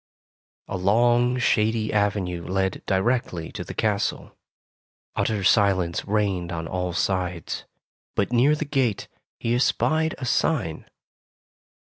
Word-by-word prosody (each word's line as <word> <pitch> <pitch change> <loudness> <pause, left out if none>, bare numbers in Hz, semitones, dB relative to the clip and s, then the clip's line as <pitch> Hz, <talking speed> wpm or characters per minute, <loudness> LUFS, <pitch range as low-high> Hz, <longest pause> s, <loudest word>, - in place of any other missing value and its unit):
A 100 - -3
long 120 +6 +3
shady 110 -2 +1
avenue 100 -4 0
led 95 0 -1
directly 95 -4 0
to - - -5
the - - -8
castle. - - -1 0.8
Utter 105 -3 0
silence 95 -4 +2
reigned 100 -4 0
on 80 -1 -4
all 90 +1 -2
sides, 90 -2 -2 0.5
but 100 +4 0
near 135 +5 +4
the 155 - -3
gate, 135 -8 0 0.3
he 115 - 0
espied 155 +5 +1
a 130 - -5
sign. 120 - 0
105 Hz, 115 wpm, -24 LUFS, 90-120 Hz, 0.8 s, near